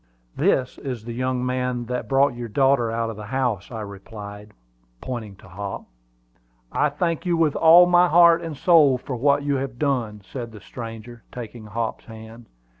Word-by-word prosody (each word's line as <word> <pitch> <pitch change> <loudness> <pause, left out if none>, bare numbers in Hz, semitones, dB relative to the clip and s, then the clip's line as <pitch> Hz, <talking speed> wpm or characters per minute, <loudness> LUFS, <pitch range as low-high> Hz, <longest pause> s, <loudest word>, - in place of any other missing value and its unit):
"This 130 -1 +1
is 125 -6 -6
the 120 - -5
young 130 +1 -1
man 125 -1 -2
that 125 +1 -4
brought 135 0 +3
your 120 0 -6
daughter 135 0 +2
out 115 0 -2
of 110 - -10
the 105 -1 -8
house," 120 -5 -1
I 115 -3 -6
replied, 105 0 -9 0.5
pointing 115 -6 -6
to - - -17
Hop. 100 +2 -6 0.9
"I 150 - +2
thank 165 +3 -2
you 170 -1 +2
with 160 -3 +2
all 170 +2 +7
my 175 0 +5
heart 170 0 +6
and 160 -4 -6
soul 150 -6 +5
for 125 +1 -6
what 140 +3 +2
you 140 -1 0
have 130 -2 -5
done," 120 -7 -1
said 115 +3 -7
the 105 - -10
stranger, 115 +2 -9
taking 115 -2 -8
Hop's 115 +2 -4
hand. 110 +1 -12
125 Hz, 180 wpm, -23 LUFS, 110-140 Hz, 0.9 s, all